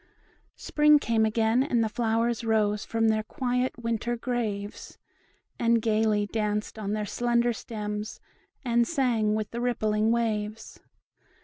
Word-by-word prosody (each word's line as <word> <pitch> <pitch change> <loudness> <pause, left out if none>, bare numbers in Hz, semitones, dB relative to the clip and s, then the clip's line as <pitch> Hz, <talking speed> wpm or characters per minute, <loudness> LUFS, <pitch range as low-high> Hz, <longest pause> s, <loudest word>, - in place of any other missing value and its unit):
Spring 300 0 +4
came 225 -5 +1
again, 225 +2 +2
and 245 -4 +1
the - - +1
flowers 230 +1 0
rose 210 -2 +1
From 225 0 0
their 215 0 +2
quiet 250 +3 -2
winter 235 0 -2
graves, 220 -5 -4 0.6
And 235 0 +3
gayly 215 -1 +1
danced 210 0 -2
on 205 -1 -3
their 215 -1 -2
slender 240 +2 +1
stems, 210 -1 -5 0.5
And 235 -1 +2
sang 235 -8 +1
with 215 -1 -3
the 235 - -4
rippling 215 -3 +1
waves. 220 -2 -2
225 Hz, 130 wpm, -27 LUFS, 215-240 Hz, 0.6 s, Spring